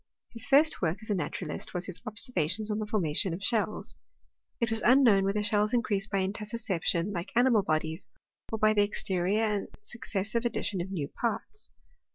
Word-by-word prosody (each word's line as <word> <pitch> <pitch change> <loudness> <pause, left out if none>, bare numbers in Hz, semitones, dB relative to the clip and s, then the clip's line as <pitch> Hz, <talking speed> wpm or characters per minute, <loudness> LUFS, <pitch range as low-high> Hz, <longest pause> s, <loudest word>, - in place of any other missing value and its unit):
His 230 -2 -3
first 300 +3 +5
work 170 +1 0
as 220 - -5
a - - +4
naturalist 175 -4 -4
was 180 0 -2
his 185 -3 -8
observations 215 - 0
on 210 - -1
the 215 - -3
formation 180 -4 0
of 195 - -9
shells. 215 -2 -1 0.6
It 235 -1 0
waa 225 - +1
unknown 235 -6 +5
whether 205 +2 0
shells 210 +2 +1
increase 210 -4 0
by 195 -2 0
intussusception^ 205 -3 -2
like 175 +2 -4
animal 240 -3 +5
bodies, 160 -1 -2 0.4
or 220 - -1
by 215 0 +4
the 210 - +3
exterior 200 0 0
and 210 -2 0 0.2
successive 220 0 -3
addition 215 -5 -1
of 180 - -5
new 165 -8 -3
parts. 240 - -4
210 Hz, 175 wpm, -29 LUFS, 185-225 Hz, 0.6 s, first